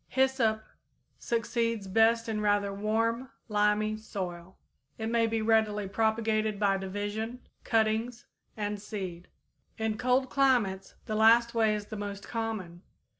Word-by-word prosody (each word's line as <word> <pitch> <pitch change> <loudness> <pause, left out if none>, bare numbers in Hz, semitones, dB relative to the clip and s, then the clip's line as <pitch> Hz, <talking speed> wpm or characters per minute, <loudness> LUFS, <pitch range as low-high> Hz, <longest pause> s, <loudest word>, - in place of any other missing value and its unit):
_ - - -43
Hyssop 255 -5 +1 0.6
succeeds 230 -2 -1
best 225 +4 +3
in 215 -1 -2
rather 205 -1 +1
warm, 225 +5 0 0.2
limy 210 0 +1
soil. 185 -4 -6 0.4
It 220 0 -3
may 230 -1 +3
be 225 -1 -1
readily 215 -2 +2
propagated 220 0 0
by 200 -2 +3
division, 205 +5 -4 0.2
cuttings, 225 +2 0 0.3
and 205 -1 -3
seed. 185 -5 -6 0.5
In 220 -1 -2
cold 255 +1 +2
climates 245 -9 +1
the 215 - -4
last 230 +2 +5
way 220 -2 +3
is 210 -1 -5
the 215 0 -7
most 200 -1 -6
common. 220 -7 -4
220 Hz, 130 wpm, -29 LUFS, 205-230 Hz, 0.6 s, last